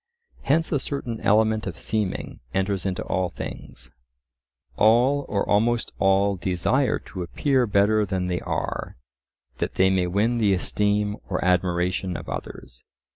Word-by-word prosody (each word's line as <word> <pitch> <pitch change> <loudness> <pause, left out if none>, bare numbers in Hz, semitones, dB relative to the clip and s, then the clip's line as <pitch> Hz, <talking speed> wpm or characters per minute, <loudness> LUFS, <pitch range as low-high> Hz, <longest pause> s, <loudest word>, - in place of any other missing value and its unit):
Hence 160 +4 +1
a 145 - +2
certain 130 -4 -4
element 110 +1 +2
of 85 -4 -5
seeming 105 -4 -2 0.2
enters 95 0 0
into 95 - -2
all 95 -2 -1
things; - - -7 0.8
all 125 +6 +3
or 100 -1 0
almost 115 +3 +1
all 95 +1 +3
desire 95 +9 +1
to 95 - -8
appear 130 - +1
better 105 +1 +3
than 95 -2 -2
they 90 -1 -1
are, - - -3 0.6
that - - -2
they 95 0 +4
may 95 -1 +1
win 110 +6 +1
the 105 -3 +3
esteem 105 +2 0
or 90 -2 -1
admiration 90 0 +1
of - - -9
others. - - -7
100 Hz, 140 wpm, -24 LUFS, 95-110 Hz, 0.8 s, they